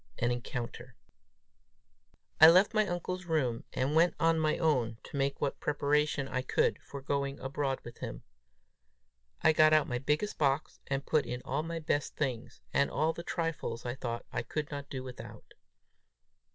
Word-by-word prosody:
AN 120 +1 +1
ENCOUNTER. 120 0 -5 1.4
I 160 - +11
left 185 +6 +5
my 215 -1 +3
uncle's 180 +1 -3
room, 135 -9 0
and 135 +3 -1
went 170 +2 +4
to 165 0 +4
my 155 -1 +1
own, 125 -9 +1
to - - -10
make 140 0 0
what 140 - -2
preparation 145 -1 +1
I 130 - -1
could 130 - +1
for 140 -1 -9
going 140 0 -1
abroad 135 0 -2
with 120 0 -11
him. - - -6 1.2
I 160 - +6
got 155 0 +6
out 155 -1 +5
my 125 -2 -2
biggest 150 +10 -1
box, 140 0 0
and 135 0 -2
put 155 -2 +1
in 125 0 -4
all 140 +4 -1
my 165 +1 -4
best 150 -2 -1
things, 130 -6 -3
and 140 - +3
all 155 +3 +1
the 170 - -6
trifles 165 -9 -3
I 120 - -2
thought 120 -2 -4
I - - -1
could 150 +6 -4
not 140 -1 -6
do 130 -2 -5
without. 125 -1 -10
140 Hz, 170 wpm, -31 LUFS, 130-155 Hz, 1.4 s, I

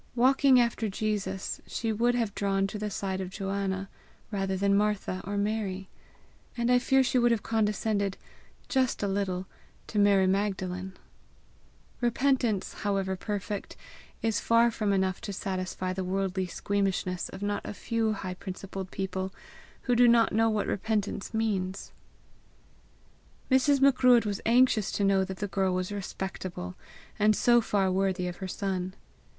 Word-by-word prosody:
Walking 260 +1 +5
after 235 -2 +1
Jesus, 195 -2 -3
she 225 -1 -2
would 240 +3 +2
have 230 -4 -1
drawn 195 -1 0
to 200 +2 -5
the 210 0 -2
side 190 -1 -3
of 185 - -4
Joanna 195 -1 -3 0.4
rather 195 -2 -1
than 200 +1 +2
Martha 205 -2 0
or 200 +1 -3
Mary; 200 -2 -2 0.7
and 235 +1 +1
I 250 - +6
fear 265 +1 +3
she 255 0 +2
would 240 0 +4
have 230 -3 +1
condescended 210 -2 0 0.5
just 260 -5 +1
a - - +1
little 190 -2 -1 0.4
to 210 - -2
Mary 200 -2 +5
Magdalen: 190 -1 -1 1.0
repentance, 240 -4 +1
however 195 -2 0
perfect, 205 +1 -4 0.5
is 225 -1 +1
far 230 +1 +4
from 210 -2 -1
enough 190 -1 0
to 205 - -5
satisfy 185 -1 -3
the 190 0 -3
worldly 190 0 -1
squeamishness 190 -1 -1
of 190 - -8
not 205 0 -1
a - - -5
few 225 +1 -1
high 190 -3 -5
principled 190 0 -7
people 190 0 -3 0.5
who 245 - +2
do 245 +1 +6
not 235 -1 +4
know 225 +1 +3
what 215 -2 0
repentance 205 -1 -2
means. 195 -4 -2 1.6
Mrs. 270 +2 +4
Macruadh 255 -3 +5
was 205 -1 -2
anxious 235 -3 +4
to 205 - 0
know 195 -1 +3
that 190 0 -5
the 205 - -3
girl 190 -1 0
was 185 +1 -2
respectable, 190 - -5 0.4
and 210 0 +4
so 240 +2 +4
far 195 -3 +1
worthy 185 -1 0
of 175 - -5
her 190 - -5
son. 185 -1 -3
200 Hz, 150 wpm, -28 LUFS, 190-225 Hz, 1.6 s, I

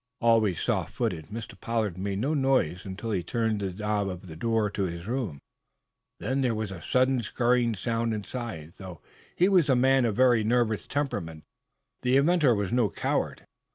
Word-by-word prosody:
Always 110 -7 +3
soft - - -1
footed, 80 -1 -2
Mr. 115 +1 -7
Pollard 110 -6 -1
made 95 +1 -3
no 135 +9 0
noise 130 - +1
until 100 +4 -5
he 95 -4 0
turned 110 +4 -1
the 100 -2 -2
knob 105 +1 -1
of 90 0 -7
the 80 -3 -9
door 110 +3 0
to 100 -1 -1
his 85 -1 -5
room. 115 - -2 0.8
There 130 -3 0
was 110 -2 -3
a 90 -3 -7
sudden, 130 0 +2
scurrying 120 0 +1
sound 115 +2 -1
inside. 105 -7 -5
Though 90 -4 -9 0.4
he 180 - +4
was 180 -7 +4
a 130 - +5
man 130 0 +4
of 110 -3 0
very 125 -3 +4
nervous 110 -1 +1
temperament 85 - -3 0.6
the 125 +1 +3
inventor 145 -4 +4
was 100 -2 -2
no 120 -3 +2
coward. - - -2
115 Hz, 175 wpm, -27 LUFS, 95-125 Hz, 0.8 s, a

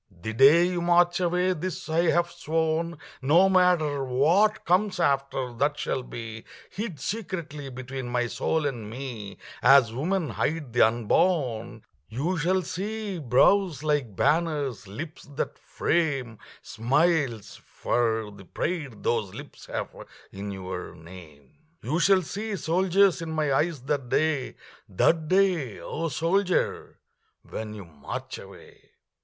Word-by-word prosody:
The 110 - -3
day 140 +8 +7
you 180 -1 -1
march 175 +1 +3
away 180 +1 +1
this 185 +2 -5
I 165 +1 +2
have 175 0 +2
sworn, 165 0 -1 0.2
No 165 +8 +5
matter 175 -7 +3
what 165 +12 +2
comes 190 +3 +2
after, 135 -2 0
that 145 +5 0
shall 130 - -2
be 115 -2 -8 0.3
Hid 200 -6 -5
secretly 170 - -5
between 130 0 -6
my 120 0 0
soul 155 +6 -1
and 120 -7 -3
me 115 -5 -7 0.2
As 130 -3 +6
women 165 +5 -1
hide 150 -6 -2
the 120 - +3
unborn 115 - 0 0.2
You 145 +11 -1
shall 185 +4 +1
see 205 +1 -4
brows 155 - +3
like 145 -9 0
banners, 145 - 0
lips 155 - -8
that - - -3
frame 135 -9 -1 0.2
Smiles, 125 - 0
for 110 -3 -1
the 100 -1 -13
pride 150 - -4
those 110 -5 -1
lips - - -11
have - - -3 0.4
in 100 +1 -6
your 95 -2 -6
name. 80 - -14 0.2
You 145 +9 0
shall 190 +1 +4
see 205 +6 -4
soldiers 185 +1 +2
in 165 - -5
my 155 -3 0
eyes 155 0 0
that 135 -3 -2
day 155 -3 0 0.3
That 155 - +2
day, 180 - +2
O 165 +2 -3
soldier, 180 +6 0 0.5
when 110 -1 -6
you 100 -3 -9
march 75 -4 -7
away. - - -15
150 Hz, 135 wpm, -26 LUFS, 120-175 Hz, 0.5 s, day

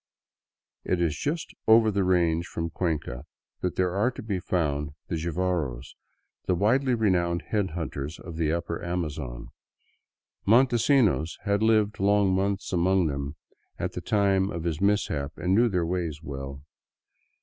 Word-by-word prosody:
It 90 - 0
is 85 -3 +1
just 155 - -3
over 110 0 +6
the 100 -1 +1
range 85 -2 +2
from 85 0 -4
Cuenca 75 -9 -2 0.4
that 90 0 -2
are 95 +6 +2
to 130 - -8
be 100 -4 -2
found 75 -5 -1
the - - -1
Jivaros, 80 -6 -2 0.5
the 90 - +3
widely 125 +7 +2
renowned 85 -6 +1
head 100 -6 0
hunters 75 -1 -4
of 85 - -9
the 80 -1 0
upper 85 0 -3
Amazon. 75 -8 -4 0.9
Montesinos 120 - +3
had 100 0 +1
lived 110 -1 +2
long 100 -1 +3
months 100 +1 -1
among 90 +1 +3
them 70 0 -3 0.4
at - - -2
the - - -5
time 100 -2 +2
of 85 -3 -4
his 85 -1 -2
mis 105 +1 +3
hap, 70 0 -4
and 90 +1 0
knew 115 +4 +4
their 90 -4 0
ways 85 -3 -2
well. 70 -1 -7
90 Hz, 150 wpm, -27 LUFS, 80-100 Hz, 0.9 s, over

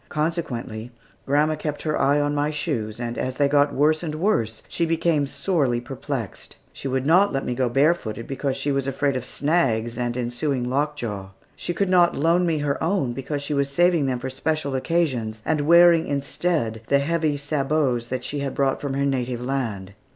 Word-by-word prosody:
Consequently, 130 -8 -3 0.4
grandma 150 +3 +3
kept 150 -1 -4
her 155 -1 0
eye 140 +2 +3
on 145 0 0
my 145 +1 +1
shoes, 120 -8 -3
and 120 -1 -4
as 130 0 -2
they 145 +1 +3
got 145 0 +3
worse 155 +3 +2
and 155 -3 -4
worse, 120 - 0
she 170 - -2
became 165 -3 +1
sorely 140 -7 0
perplexed. 130 -3 -6 0.2
She - - -6
would 130 0 -1
not 180 +6 +5
let 135 - -2
me 125 - -1
go 125 0 0
barefooted, 120 -5 +1
because 135 0 -2
she 140 +1 -1
was 135 -1 -1
afraid 140 0 0
of 130 - -2
"snags" 125 -6 0
and 120 0 -1
ensuing 125 +2 -1
lockjaw; 125 -8 -2 0.3
she - - -4
could 200 +3 +1
not 175 -2 +4
loan 170 +4 +3
me 160 -2 +1
her 145 0 -1
own, 165 -8 0
because 140 +3 -4
she 150 - -3
was 140 -1 +1
saving 170 0 +3
them 130 -1 0
for 130 +2 -5
special 145 +1 -2
occasions, 130 -7 -1
and 155 -2 +1
wearing 170 +1 +6
instead 140 -4 -1
the 140 - +4
heavy 155 +1 0
sabots 140 -4 0
she 145 - -4
had 140 -1 -3
brought 135 -1 +1
from 140 -2 -3
her 140 0 +1
native 125 -3 -1
land. 115 -7 -3
140 Hz, 190 wpm, -23 LUFS, 125-155 Hz, 0.4 s, wearing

